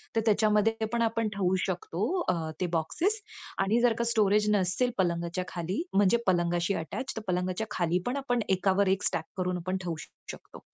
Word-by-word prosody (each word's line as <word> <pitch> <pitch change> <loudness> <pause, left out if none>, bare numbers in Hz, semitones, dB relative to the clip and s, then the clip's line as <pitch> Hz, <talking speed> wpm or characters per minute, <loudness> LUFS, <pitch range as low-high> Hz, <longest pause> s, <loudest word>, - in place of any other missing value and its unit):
तर 225 - +3
त्याच्यामध्ये 215 0 +3 0.2
पण 235 -1 0
आपण 230 -1 +1
ठेवू 190 -2 +1
शकतो 175 -2 -4 0.3
अ, - - +4 0.3
ते - - +2
बॉक्सेस. 320 - 0 0.4
आणि 215 +5 +2
जर 240 -1 +4
का - - +2
स्टोरेज 210 -2 +3
नसेल 190 +6 +1
पलंगाच्या 170 0 0
खाली 180 - -3
म्हणजे 200 +3 +4
पलंगाशी 175 0 +2
अटॅच 165 +11 -4
तर - - -2
पलंगाच्या 180 +4 -1
खालीपण 180 +9 0
आपण 245 -3 0
एकावर 190 +1 +2
एक 190 +1 +1
स्टॅक 160 - 0
करून 180 -1 -1
आपण 185 +2 -2
ठेवू 170 -2 -2 0.4
शकतो. - - -12
190 Hz, 170 wpm, -29 LUFS, 180-220 Hz, 0.4 s, अ